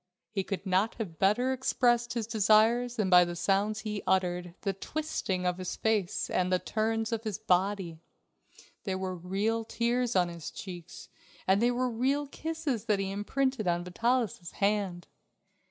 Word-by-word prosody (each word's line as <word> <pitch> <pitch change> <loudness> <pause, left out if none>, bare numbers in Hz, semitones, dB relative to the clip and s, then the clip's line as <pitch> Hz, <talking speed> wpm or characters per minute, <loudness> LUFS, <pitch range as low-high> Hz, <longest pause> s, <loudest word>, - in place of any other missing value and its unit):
He 200 -2 -1
could 195 +1 -4
not 190 +4 +1
have 185 -9 -6
better 245 +7 +3
expressed 240 -2 +1
his 230 -2 -1
desires 225 +2 +3
than 215 -4 0
by 180 -1 +7
the 175 0 -4
sounds 200 +4 +1
he 210 -2 -3
uttered, 180 -2 0
the 195 -2 -1
twisting 195 -5 -3
of 180 0 0
his 185 - -4
face, 215 -5 0
and 185 0 0
the 185 - +4
turns 225 +3 -1
of 225 -1 -2
his 215 -4 -3
body. 185 -2 0 0.8
There 190 -2 -2
were 190 0 -3
real 200 +6 -1
tears 235 +1 0
on 180 -1 +4
his 170 -3 -7
cheeks 180 -2 -9 0.4
and 195 +2 +3
they 240 - +4
were 250 +1 0
real 265 +5 0
kisses 300 -6 -3
that 210 -3 +2
he 195 0 -2
imprinted 240 +2 -1
on 175 0 +1
Vitalis' 225 -1 -1
hand. 200 -4 0
205 Hz, 165 wpm, -30 LUFS, 185-235 Hz, 0.8 s, by